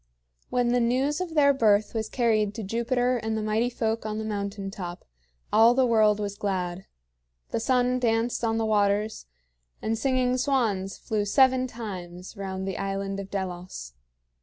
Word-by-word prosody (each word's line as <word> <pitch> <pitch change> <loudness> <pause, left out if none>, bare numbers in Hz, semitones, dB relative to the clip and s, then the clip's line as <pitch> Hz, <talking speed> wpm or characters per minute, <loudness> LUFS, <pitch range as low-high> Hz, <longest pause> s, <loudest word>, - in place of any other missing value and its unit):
When 245 -1 +1
the 245 +1 +3
news 260 +7 +1
of 340 -3 -4
their 280 -2 +5
birth 215 -5 +3
was 220 -1 -2
carried 215 -4 +1
to 225 - -5
Jupiter 245 +4 0
and 220 -1 -2
the 215 - -2
Mighty 220 +3 +1
Folk 225 -2 -2
on 215 0 -3
the 220 - -3
mountain 200 -2 -4
top, 180 -3 -7 0.5
all 230 +2 +6
the 260 0 +4
world 215 -3 +4
was 200 -1 -4
glad. 185 -2 -2 0.6
The - - 0
sun 250 +1 +2
danced 230 0 0
on 225 -1 +1
the 225 - 0
waters, 210 - +1 0.5
and 220 +1 -1
singing 255 0 +1
swans 225 -8 0
flew 215 -2 -2
seven 255 +4 +3
times 185 -6 -8
round 190 -1 -4
the 195 - -3
island 195 0 -3
of 195 -1 -7
Delos. 180 - -5
220 Hz, 165 wpm, -26 LUFS, 200-245 Hz, 0.6 s, all